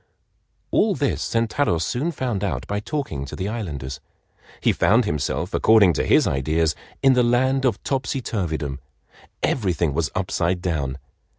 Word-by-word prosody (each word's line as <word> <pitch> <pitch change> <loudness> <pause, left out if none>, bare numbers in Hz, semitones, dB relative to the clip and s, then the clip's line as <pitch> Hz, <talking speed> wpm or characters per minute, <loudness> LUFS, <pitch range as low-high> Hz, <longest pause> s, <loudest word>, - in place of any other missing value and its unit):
All 210 -3 +3
this 140 -4 -1
Sentaro 115 -3 +1
soon 125 - -1
found 125 - -2
out 100 - -2
by 105 0 -2
talking 105 - -3
to 70 - -7
the 95 - -3
islanders. 75 - -5 0.6
He - - +3
found 115 +3 +3
himself, 85 +1 -2
according 105 -5 +5
to - - -1
his - - +5
ideas, 80 +4 +1 0.3
in 135 -1 +6
the 125 - +4
land 130 +3 +2
of 125 - 0
Topsyturvydom. 90 - -2 0.6
Everything 90 - +1
was 80 +1 0
upside 90 -1 0
down. 75 -7 -2
100 Hz, 140 wpm, -23 LUFS, 80-125 Hz, 0.6 s, in